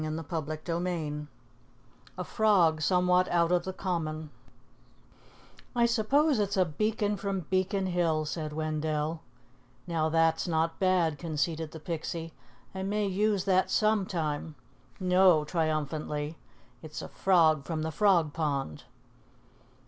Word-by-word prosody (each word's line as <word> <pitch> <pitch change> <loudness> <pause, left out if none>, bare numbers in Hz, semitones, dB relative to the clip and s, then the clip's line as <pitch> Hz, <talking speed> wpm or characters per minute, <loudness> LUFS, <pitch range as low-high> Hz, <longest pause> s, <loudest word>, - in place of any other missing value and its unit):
CHAPTER 155 +1 -3
V 155 -4 -3 0.9
A 180 - -3
FROG 180 -7 +3
SOMEWHAT 180 +1 +3
OUT 170 0 +2
OF 175 -1 +2
THE 190 - -4
COMMON 160 -5 -3 1.4
"I 235 -1 +4
suppose 255 +5 +2
it's 200 -1 0
a 185 - +4
beacon 210 +5 -1
from 195 -2 -2
Beacon 190 +1 +1
Hill," 170 -4 +1
said 155 0 -4
Wendell. 155 0 -2 0.6
"Now, 160 -2 0
that's 165 +1 +2
not 165 0 0
bad," 180 -5 +2
conceded 160 0 -2
the 160 - -9
Pixie. 165 0 -5 0.4
"I 190 - -5
may 205 +2 0
use 200 0 +1
that 190 -1 +2
some 215 -3 +2
time. 155 -2 -3 0.4
No," 180 -3 +4
triumphantly, 155 -1 -2 0.5
"it's 155 -1 -7
a - - -6
frog 160 -6 +3
from 155 0 -3
the 160 - -2
Frog 170 -5 +3
Pond." 140 - -2
165 Hz, 125 wpm, -29 LUFS, 155-190 Hz, 1.4 s, I